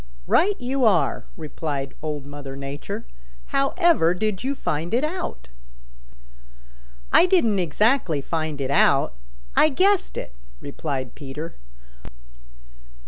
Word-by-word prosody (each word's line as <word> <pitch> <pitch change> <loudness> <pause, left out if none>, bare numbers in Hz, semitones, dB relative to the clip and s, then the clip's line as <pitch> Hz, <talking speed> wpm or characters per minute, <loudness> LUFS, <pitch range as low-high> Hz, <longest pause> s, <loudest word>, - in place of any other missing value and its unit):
"Right 395 +3 +3
you 260 +1 -1
are," 200 -7 +3
replied 145 -3 -4
Old 150 -3 -4
Mother 140 -1 -8
Nature. 140 - -6 0.5
"However 275 - +3
did 215 +2 -2
you 275 +2 -1
find 165 - -2
it 250 - +1
out?" 350 +4 -4 1.7
"I 355 - +7
didn't 235 - +3
exactly 180 - +2
find 155 0 -3
it 135 0 -2
out; 140 - +4 0.4
I 310 - +6
guessed 380 +6 +2
it," - - -6 0.3
replied 140 -3 -4
Peter. 150 +4 -7
165 Hz, 110 wpm, -24 LUFS, -, 1.7 s, I